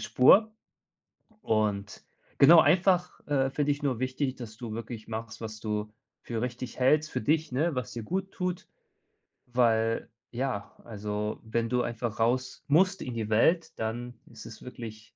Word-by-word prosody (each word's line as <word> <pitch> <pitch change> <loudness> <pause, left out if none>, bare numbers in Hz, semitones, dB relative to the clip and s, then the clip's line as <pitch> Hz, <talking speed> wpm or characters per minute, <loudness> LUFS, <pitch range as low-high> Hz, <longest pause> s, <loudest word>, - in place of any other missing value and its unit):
Spur. 215 - +5 0.9
Und 105 -2 -1 0.3
genau 160 +4 +9
einfach, 180 0 +3
äh, 135 -2 +2
für 145 +1 0
dich 145 +1 0
nur 130 -5 0
wichtig, 130 +1 -1
dass 115 -4 -9
du 115 -1 -6
wirklich 115 -1 -7
machst, 110 0 -6
was 110 -1 -6
du 105 -1 -3 0.3
für 115 -2 -4
richtig 125 0 -5
hältst 150 +4 +3
für - - -1
dich, 155 +5 +1
ne, 150 +5 0
was 125 -4 -3
dir 115 - -6
gut 190 - -3
tut, 180 -1 -3 0.8
weil 115 -2 +1 0.2
ja 125 -4 -3
also, 105 -1 -4
wenn 115 +1 -1
du 125 0 +1
einfach 115 -1 -4
raus 125 +3 0
musst 185 +6 +3
in 125 - -5
die 110 -2 -3
Welt, 160 +9 +3
dann 120 +2 -4
ist 115 -2 -12
es 110 - -11
wirklich 110 -3 -9
120 Hz, 160 wpm, -28 LUFS, 110-145 Hz, 0.9 s, genau